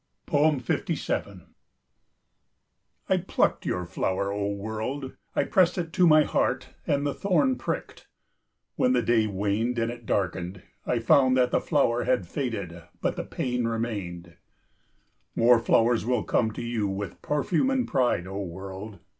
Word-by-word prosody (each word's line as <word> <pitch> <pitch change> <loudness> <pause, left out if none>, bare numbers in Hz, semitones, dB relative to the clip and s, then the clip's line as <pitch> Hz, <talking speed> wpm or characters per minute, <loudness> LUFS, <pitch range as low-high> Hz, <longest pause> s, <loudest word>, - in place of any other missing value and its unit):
57 145 -4 0 1.6
I - - +3
plucked - - 0
your 90 -1 -1
flower, 95 +3 -1
O 100 0 -1
world! 110 +7 -4 0.2
I - - +3
pressed 185 -1 +3
it 165 -2 -3
to 180 -2 +4
my 155 -1 +7
heart - - 0 0.2
and 145 0 +1
the 145 - 0
thorn 255 +7 +2
pricked. - - -5 0.7
When 255 0 +3
the - - +2
day 115 -2 +3
waned 105 +5 -1
and 115 0 0
it 120 -1 -11
darkened, 95 -1 -2 0.2
I 125 - +1
found 130 +3 +4
that 125 -1 +3
the - - +2
flower 125 -6 +1
had 125 -7 +1
faded, 100 - -4 0.2
but - - -1
the - - -3
pain 125 -1 -2
remained. 95 -7 -4 1.0
More 120 0 +5
flowers 115 0 +3
will 125 +2 0
come 110 - +1
to 120 - -6
you 115 -3 -1
with 100 0 -5
perfume 155 - +1
and 265 -2 0
pride, 120 -9 +1
O 95 +2 -5
world! 95 +3 -7
115 Hz, 145 wpm, -26 LUFS, 100-135 Hz, 1.6 s, my